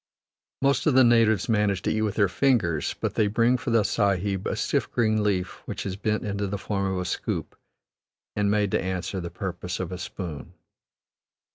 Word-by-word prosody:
Most 140 +3 +2
of 145 - +3
the 130 - +7
natives 115 -4 +4
manage 105 -4 +1
to - - 0
eat 110 - 0
with 105 -1 -1
their 100 -2 +4
fingers, 90 - +1
but - - -2
they 105 - +2
bring 115 +4 +3
for 125 - -3
the 115 -2 +4
Sahib 100 -2 0
a - - -1
stiff - - -1
green 110 -2 +2
leaf 95 -3 -1
which - - -5
is 95 -2 -3
bent 105 +2 -1
into 100 0 -2
the 100 +1 -3
form 100 -1 -2
of 95 - -2
a 90 - -2
scoop 90 - -3 0.8
and 105 -1 +1
made 105 -1 +1
to - - +1
answer 95 0 -3
the 85 - -5
purpose 90 -1 -5
of 90 -1 -4
a 90 - -5
spoon. 85 -5 -7
100 Hz, 195 wpm, -26 LUFS, 95-110 Hz, 0.8 s, the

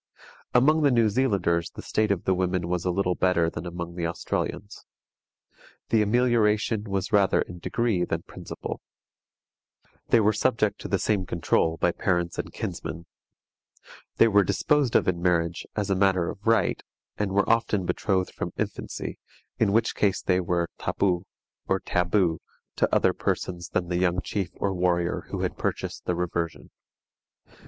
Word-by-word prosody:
Among 150 +6 +5
the 145 - +5
New 115 -4 +4
Zealanders 100 -8 +1
the - - -10
state 110 0 0
of 100 -3 0
the 95 - +2
women 90 -1 0
was 90 0 -2
a - - +1
little 90 0 +1
better 85 -3 +2
than 85 +2 -6
among 85 0 -5
the 85 -1 -2
Australians. 100 +4 -4 1.1
The 110 - +4
amelioration 110 -1 +2
was 100 0 -3
rather 100 -2 +4
in 90 0 -10
degree 110 -1 0
than 85 -1 -2
principle. - - -7 1.3
They 120 - +5
were 105 0 +3
subject 105 -2 +1
to - - -5
the 100 - +1
same 95 -1 0
control 80 -1 +1
by 85 - +2
parents 85 -2 -1
and - - -4
kinsmen. 85 0 -5 1.1
They 115 - +6
were 100 -2 +5
disposed 145 +6 +1
of - - +4
in 85 -2 0
marriage 85 -1 0
as 105 -2 -1
matter 95 -3 +2
of 100 - -11
right, 115 -5 +2 0.4
and 105 -2 0
were 100 +1 +2
often 115 -4 +2
betrothed 95 0 0
from - - -4
infancy, - - -4 0.4
in 105 -3 +3
which 115 +2 +2
case 100 -3 +1
they 90 -1 +2
were 85 -1 0
tapu 90 -2 0 0.4
or - - +1
taboo 90 -1 +1 0.4
to - - +2
other - - +3
persons 85 -2 -3
than 90 -1 -1
the 90 - 0
young 90 0 +2
chief 95 -1 -3
or 100 -1 -1
warrior 90 -1 0
who - - -3
had - - -3
purchased - - -3
the 90 - 0
reversion. 85 -1 -3
95 Hz, 160 wpm, -26 LUFS, 85-105 Hz, 1.3 s, They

